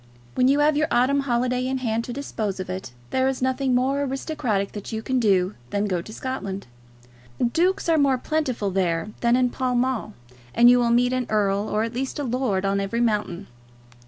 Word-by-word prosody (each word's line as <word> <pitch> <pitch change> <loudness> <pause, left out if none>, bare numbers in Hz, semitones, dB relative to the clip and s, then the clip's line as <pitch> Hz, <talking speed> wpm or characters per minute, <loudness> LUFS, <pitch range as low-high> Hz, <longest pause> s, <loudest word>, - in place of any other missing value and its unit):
When 255 - +3
you 280 +2 +3
have 300 0 +4
your 300 +1 +2
autumn 260 +4 +3
holiday 250 -1 0
in 265 0 -1
hand 230 -3 -1
to - - -6
dispose 220 -7 -4
of 185 0 -4
it, 185 -9 -6 0.2
there 260 0 +2
is 265 -1 -1
nothing 260 0 +1
more 270 +3 +1
aristocratic 265 -7 -2
that 205 +1 -7
you 220 0 -4
can 260 +1 0
do 195 -4 +2 0.2
than 205 0 0
go 185 -4 -1
to 215 - -11
Scotland. 215 -6 -5 0.7
Dukes 350 +12 +1
are 325 -2 +3
more 275 -2 +3
plentiful 255 -8 -1
there 180 0 0
than 235 0 +3
in 250 -1 +2
Pall 255 -1 -1
Mall, 245 -4 -1 0.4
and 240 +1 +7
you 245 - +5
will 240 -1 +2
meet 245 +2 +3
an 255 -1 -1
earl 205 0 +1
or 215 +1 0
at 230 +1 -4
least 260 +2 -3
a 290 - -2
lord 245 -6 -1
on 195 0 +1
every 200 +4 -2
mountain. 210 -5 0
245 Hz, 205 wpm, -24 LUFS, 205-260 Hz, 0.7 s, and